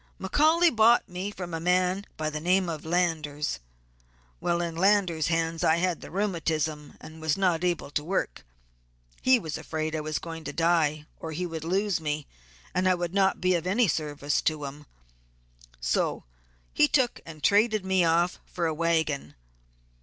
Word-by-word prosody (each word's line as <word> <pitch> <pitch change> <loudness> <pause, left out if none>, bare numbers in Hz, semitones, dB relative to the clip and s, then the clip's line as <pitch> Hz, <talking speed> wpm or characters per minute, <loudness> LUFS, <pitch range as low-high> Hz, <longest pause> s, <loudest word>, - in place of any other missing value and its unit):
"McCaully 315 - +3
bought 225 +2 +5
me 185 +3 -4
from 180 -4 -7
a 165 - -2
man 180 +3 +1
by 155 0 -2
the 150 - -3
name 180 +3 +2
of 155 -3 -5
Landers. 160 - -1 0.8
While 170 0 0
in 170 -1 -3
Landers' 185 -4 +2
hands 165 -1 0
I 160 - +4
had 175 0 0
the - - -9
rheumatism 160 -6 -2
and 160 0 -12
was 160 0 0
not 180 -3 +1
able 175 -5 -1
to 150 - -1
work. 170 - -2 0.8
He 260 0 +5
was 160 -9 -5
afraid 155 0 -3
I - - -1
was 155 0 -2
going 165 -1 -7
to - - -5
die, 160 -3 +1
or 160 -1 -6
he 180 +4 -2
would 165 -2 -5
lose 190 +1 0
me, 150 -1 -2 0.5
and 185 +1 +2
I 185 - +4
would 175 0 -3
not 195 -1 +2
be 185 0 +2
of 175 0 -1
any 220 +5 +3
service 145 -3 -1
to 155 -2 -1
him, 145 +1 -9 0.9
so - - 0 0.5
he 150 - +5
took 255 - +1
and 155 -3 -11
traded 210 +3 +3
me 190 -1 +3
off 170 +2 +2
for 175 - -3
a 160 - 0
wagon. 155 - 0
170 Hz, 175 wpm, -27 LUFS, 155-185 Hz, 0.9 s, bought